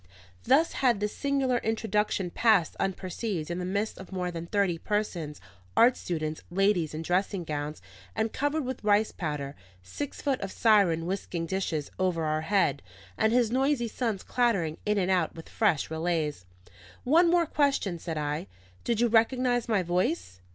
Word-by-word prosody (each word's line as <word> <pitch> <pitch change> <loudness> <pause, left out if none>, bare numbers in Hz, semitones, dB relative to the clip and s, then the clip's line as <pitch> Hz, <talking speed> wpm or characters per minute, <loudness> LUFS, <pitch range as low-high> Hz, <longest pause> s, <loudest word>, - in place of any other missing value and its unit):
Thus 290 +7 +4
had 245 -6 +2
this 210 0 -2
singular 275 -3 +1
introduction 210 -4 -1
passed 210 -8 +3
unperceived 185 -2 -3
in 175 - -2
the 180 - -3
midst 200 +4 -2
of 190 - -10
more 180 -1 -2
than 170 0 -6
thirty 190 -3 +1
persons, 175 -8 -2 0.4
art 245 +2 +6
students, 155 -3 -3
ladies 180 -4 +1
in 160 - -4
dressing 185 +2 0
gowns 150 -1 -4 0.3
and 220 0 -1
covered 290 +1 0
with 260 -2 -5
rice 210 +1 +3
powder, 150 -4 -4 0.3
six 270 - -6
foot 275 -3 -1
of 195 - -4
Siron 200 -8 +3
whisking 180 -2 -3
dishes 165 -5 -2
over 180 -3 +1
our 155 0 0
head, 160 -6 +1 0.3
and 220 0 +2
his 240 -2 +3
noisy 265 -1 +1
sons 225 -4 -2
clattering 195 -11 0
in 210 0 +2
and 190 -1 +1
out 180 -4 +1
with 165 - -10
fresh 185 -9 +1
relays. 160 - -1 0.6
"One 335 +7 +5 0.2
question 280 - +1
more," 170 - -7
said 165 -1 -4
I: 150 -6 -2 0.4
"Did 235 -1 0
you 240 - +4
recognise 245 +1 +2
my 205 -4 +2
voice?" 165 - -1
195 Hz, 165 wpm, -28 LUFS, 165-230 Hz, 0.6 s, art